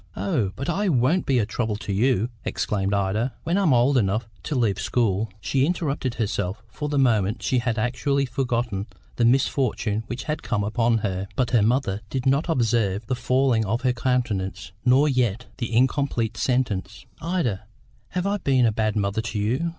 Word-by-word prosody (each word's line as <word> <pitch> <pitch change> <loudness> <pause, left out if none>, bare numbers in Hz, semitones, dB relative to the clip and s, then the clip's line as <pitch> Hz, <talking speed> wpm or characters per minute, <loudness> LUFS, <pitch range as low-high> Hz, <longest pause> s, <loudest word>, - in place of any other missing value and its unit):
"Oh, 100 +1 0
but 135 - -5
I 195 +3 0
won't 150 +5 +2
be 135 - +3
a 110 - +2
trouble 110 0 -2
to 100 -1 -4
you," 120 +2 +2
exclaimed 100 -2 -1
Ida. 100 +5 0
"When 170 - 0
I'm 195 -6 +3
old 125 +2 +4
enough 105 +2 0
to 145 - -3
leave 110 -7 +1
school 110 -3 0
" 110 - -29
She 135 +5 +1
interrupted 145 -6 -1
herself, 105 -2 -2
for 150 +7 -4
the 145 - -1
moment 110 -5 +2
she 130 - +2
had 120 -2 -1
actually 140 +5 0
forgotten 120 -5 -2 0.3
the 120 - +3
misfortune 120 -4 +1
which 120 +2 -5
had 150 0 -3
come 105 -4 -1
upon 115 +2 +1
her. 95 0 -2
But 125 -3 0
her 120 -3 +4
mother 110 -2 +1
did 130 -1 -3
not 140 +6 +2
observe 115 - +1
the 130 - -1
falling 130 -2 +2
of 110 +4 -1
her 130 -1 +2
countenance, 110 -7 -1
nor 130 +4 +5
yet 125 -4 0
the 120 -2 -3
incomplete 120 -2 +1
sentence. 110 -6 -1 0.2
"Ida, 155 - -1 0.4
have 180 0 -3
I 200 +1 +1
been 135 -9 +2
a 115 - +3
bad 110 -1 0
mother 100 +1 0
to 115 -1 -4
you?" 125 +11 0
120 Hz, 185 wpm, -24 LUFS, 105-130 Hz, 0.4 s, nor